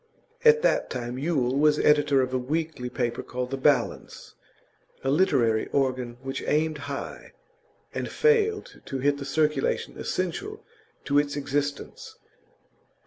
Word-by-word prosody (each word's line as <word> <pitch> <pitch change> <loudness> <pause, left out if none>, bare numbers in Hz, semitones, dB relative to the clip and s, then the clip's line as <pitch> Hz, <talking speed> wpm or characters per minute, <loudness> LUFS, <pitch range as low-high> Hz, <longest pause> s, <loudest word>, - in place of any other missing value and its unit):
At 460 0 +6
that - - +2
time 125 0 -4
Yule 135 -5 0
was 150 +1 +4
editor 145 -3 +4
of 130 0 -4
a - - +2
weekly 150 -1 -3
paper 120 -1 -2
called 125 0 -5
The 135 - -2
Balance, 140 +2 0 0.7
a 135 - +1
literary 120 -9 +2
organ 130 -3 -1
which 135 0 -4
aimed 155 0 +1
high, 140 - -6 0.6
and - - -3
failed 440 -2 +1
to 135 - -4
hit 140 +2 +1
the 140 - -5
circulation 150 -1 0
essential 395 - -3 0.4
to 145 0 +3
its 145 -1 -1
existence. 145 0 -3
140 Hz, 135 wpm, -26 LUFS, 130-155 Hz, 0.7 s, At